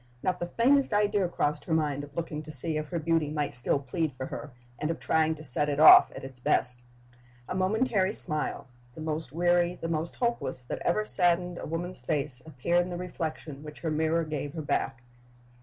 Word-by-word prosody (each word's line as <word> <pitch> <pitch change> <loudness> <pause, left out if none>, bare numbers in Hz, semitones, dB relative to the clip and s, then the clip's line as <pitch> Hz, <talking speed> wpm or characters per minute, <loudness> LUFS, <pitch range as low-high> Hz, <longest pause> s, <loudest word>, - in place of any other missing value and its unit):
Not 185 -1 0
the 175 - -3
faintest 255 +4 +2
idea 205 -2 +2
crossed 150 -3 -2
her 160 - 0
mind 145 -3 -1
of 145 0 -12
looking 160 -3 -4
to 155 - -10
see 155 +3 -3
if 155 0 -3
her 175 - -2
beauty 165 -1 0
might 150 -1 -2
still 125 +3 +2
plead 145 +2 -3
for 130 +1 -6
her, 145 - -7 0.3
and 150 - -2
of 165 - -3
trying 160 0 +1
to 155 - -11
set 145 +2 +4
it 145 0 -2
off 155 - +9
at - - -8
its 135 -2 -10
best. 125 0 +1 0.7
A - - -4
momentary 195 +1 +1
smile, 155 -10 +3 0.3
the - - -9
most 155 -3 -4
weary, 175 +2 +2
the 165 - -4
most 165 0 -3
hopeless, 235 - -2
that 125 - -5
ever 215 +5 +1
saddened 175 -2 +2
a - - -6
woman's 175 +2 -4
face, 135 0 -2
appeared 165 +4 +1
in 175 - -4
the 175 - -5
reflection 160 -5 -5
which 150 0 -11
her 160 - -2
mirror 160 +2 +1
gave 150 -2 -5
her 160 - -4
back. 130 -3 -2
160 Hz, 205 wpm, -28 LUFS, 145-175 Hz, 0.7 s, off